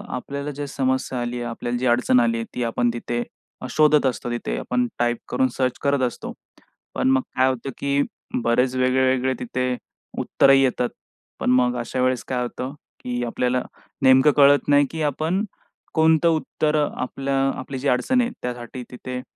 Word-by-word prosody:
आपल्याला 140 +3 -5
जे 145 - -4
समस्या 130 -1 -1
आली 120 0 -3
आहे, 120 - -4
आपल्याला 120 +1 -3
जी 125 - -2
अडचण 120 +1 +4
आली 115 -1 +2
आहे, 115 - -3
ती 125 - -1
आपण 120 +1 +1
तिथे 120 0 -3 0.5
शोधत 150 +1 +4
असतो 120 -1 -1
तिथे 90 - -3
आपण 125 0 0
टाइप 120 0 +1
करून 130 - +2
सर्च 130 -2 0
करत 140 -1 +2
असतो. 120 - -7 0.6
पण - - +1
मग 130 0 +3
काय 130 - +4
होतं, 130 +1 -3
की 140 0 +1 0.4
बरेच 125 +2 +2
वेगळे 130 +1 +2
वेगळे 130 0 +1
तिथे 125 +1 -2 0.4
उत्तरही 135 0 +4
येतात. 125 -1 +1 0.5
पण - - 0
मग 125 -1 +3
अशा 125 +2 -3
वेळेस 130 -1 +1
काय 125 -1 -1
होतं, 125 +2 -4 0.3
की 125 -1 -2
आपल्याला 125 +2 0 0.4
नेमकं 130 +3 +6
कळत 145 0 +5
नाही, 145 0 +5
की 160 - -4
आपण 160 +7 0 0.5
कोणतं 160 +1 +4
उत्तर 155 0 -1
आपलं 135 0 -1
आपली 135 -1 -6
जी 140 - -2
अडचण 140 - +2
आहे 240 - 0
त्यासाठी 125 0 -5
तिथे 125 0 -6
130 Hz, 170 wpm, -23 LUFS, 125-140 Hz, 0.6 s, नेमकं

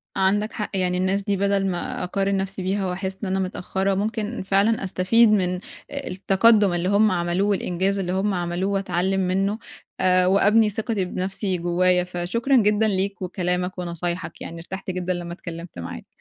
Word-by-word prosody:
عندك 205 +3 +1
حق، 210 - -3
يعني 180 -1 0
الناس 190 +2 +1
دي 200 -1 0
بدل 200 0 +1
ما 175 -2 -3
أقارن 195 +2 0
نفْسي 195 0 -3
بيها 190 +1 -1
واحس 190 +1 -3
إن - - -1
أنا 190 +1 0
متأخّرة، 190 +1 -1
ممكن 215 +2 -2
فعلًا 200 +3 +2
أستفيد 195 +5 +4
من 180 -3 +1 0.3
التَقدُّم 205 -5 +3
اللي 175 +1 0
هُم 205 +1 +4
عملوه 175 +3 0
والإنجاز 195 0 0
اللي 180 -1 -2
هُم 195 +2 0
عملوه 175 +2 -1
واتلّعم 195 -1 0
منه، 195 +3 0 0.4
آآ 185 -1 +4
وأبني 210 +3 +4
ثِقَتي 215 -2 -2
بنفْسي 185 +1 -2
جوايا، 180 +1 +2
فشكرًا 180 +9 -1
جدًا 210 -1 +3
ليك 195 0 -1
وكلامك 180 0 -2
ونصايحك، 170 -1 -4
يعني 170 - -7
ارتحت 190 +3 -6
جدًا 185 0 -2
لمّا 175 -1 -5
اتكلّمت 170 - -8
معاك. 85 - -7
190 Hz, 165 wpm, -23 LUFS, 180-200 Hz, 0.4 s, أستفيد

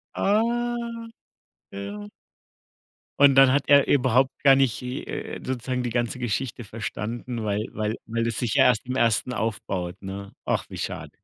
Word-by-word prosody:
Ah, 205 +2 +3 1.3
ja. 100 +1 -7 1.1
Und 140 -1 +7
dann 135 -1 +7
hat 140 +1 +2
er 140 -1 +6
überhaupt 130 -1 +3
gar 135 -2 +7
nicht, 135 -4 +1
äh 125 0 -5
äh, - - -7
sozusagen 125 0 -2
die 120 - -2
ganze 120 +1 -1
Geschichte 120 +1 -3
verstanden, 115 +2 -5
weil 105 0 -1
weil 110 0 -2
weil 115 +1 -1
es 115 -2 -2
sich 120 -4 -1
ja - - +6
erst 110 - +3
im 130 - -2
1. 115 0 +1
aufbaut, 95 -5 -3
ne? 100 +1 -7
Ach, - - 0
wie - - -8
schade. - - -5
120 Hz, 160 wpm, -25 LUFS, 105-130 Hz, 1.3 s, Und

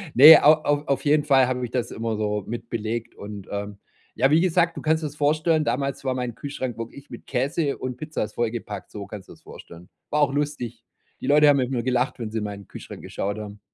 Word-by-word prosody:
Ne, 150 +6 +10
au 150 - +9
au 145 0 +1
auf 140 +2 -1
jeden 150 0 +3
Fall 135 -3 +5
habe 125 0 -2
ich 120 - -3
das 125 -2 -2
immer 115 -1 -3
so 105 -1 -1
mit 115 0 -6
belegt 115 +1 -3
und, 100 -1 -9
ähm, 100 0 -5 0.4
ja, 135 +4 +3
wie 160 +2 +5
gesagt, 175 -2 +2
du - - -5
kannst 160 +1 +2
dir - - -1
das 145 - -10
vorstellen 155 +2 +2
damals 140 -1 -2
war 130 - +1
mein 125 -2 -3
Kühlschrank 130 -4 -5
wirklich 125 +5 -8
mit - - -10
Käse 140 +3 -1
und 130 -1 -4
Pizza 155 -1 -3
ist - - -7
vollgepackt, 115 -4 -4
so 100 -1 -7
kannst 100 -2 -9
du - - -10
das - - -21
vorstellen. 85 +1 -13 0.2
War 150 - +2
auch 140 -2 +3
lustig. 140 -6 -3 0.4
Die - - -5
Leute 150 +1 +6
haben 145 -1 +6
mit 130 0 0
mir 120 -2 0
gelacht, 125 +1 0
wenn 110 -2 -4
sie 110 - -3
in 105 - -4
meinen 100 -2 -7
Kühlschrank - - -10
geschaut 100 +2 -4
haben. 105 -1 -8
125 Hz, 240 wpm, -24 LUFS, 110-145 Hz, 0.4 s, Ne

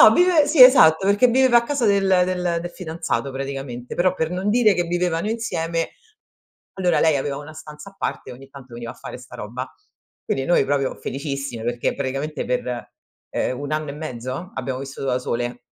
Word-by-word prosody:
no - - +10
vive 350 -5 +4
sì, 290 -3 +7
esatto, 190 - +7
perché 205 +5 +5
viveva 250 0 +5
a - - -1
casa 275 -1 -1
del 200 -2 +3 0.2
del 180 -2 -1
del 175 - -5
fidanzato 160 -7 -3
praticamente. 135 -2 -6
Però, 180 +1 +2
per 160 -2 -2
non 185 +3 -2
dire 220 0 +4
che 175 -2 0
vivevano 175 +2 -1
insieme, 165 -7 -2 0.9
allora 180 -3 +2
lei 160 -2 +4
aveva 140 +1 -3
una 150 +2 -10
stanza 150 +4 -11
a - - -25
parte, - - -4
e - - -7
ogni 135 +2 -13
tanto 135 -3 -14
veniva 120 0 -7
a - - -19
fare - - -9
'sta 125 - -12
roba. 125 +5 -6 0.5
Quindi, 135 - -2
noi 175 - +3
proprio 135 -1 0
felicissime, 140 -4 -5
perché 120 0 -1
praticamente 140 +2 -3
per, 125 -1 -3 0.4
ehm, 125 - -1
1 145 +1 -5
anno 155 -1 -2
e - - -5
mezzo, 145 - -6
abbiamo 130 -1 -3
vissuto 135 0 -6
da 125 0 +1
sole. 120 0 -3
155 Hz, 195 wpm, -22 LUFS, 130-185 Hz, 0.9 s, no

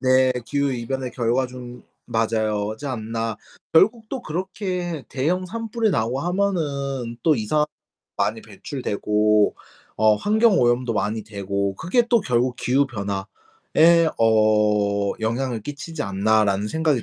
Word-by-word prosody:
네. 130 0 +4
기후 140 -1 0
이변의 125 +1 -3
결과 120 +2 +1
좀 125 -1 -10 0.2
맞아요. 110 -2 0
지 145 - -7
않나. 115 -3 -3 0.4
'결국 220 +7 +4
또 265 - -4
그렇게 180 -2 -4
대형 175 +8 -1
산불이 225 +2 -1
나고 120 -3 0
하면은 140 -9 -1
또 160 - +4
이산화탄소 150 +7 +1 0.5
많이 - - 0
배출되고 105 -4 0 0.4
어 110 0 +5
환경오염도 130 - +3
많이 110 +1 -1
되고 100 -1 -3
그게 180 - +2
또 235 -1 +4
결국 125 -4 0
기후 135 +3 +2
변화에 120 - +1
어 105 -2 +3
영향을 115 +1 -1
끼치지 145 +5 -6
않나?'라는 100 0 +1
생각이 155 -3 +1
125 Hz, 270 characters per minute, -23 LUFS, 110-160 Hz, 0.5 s, 어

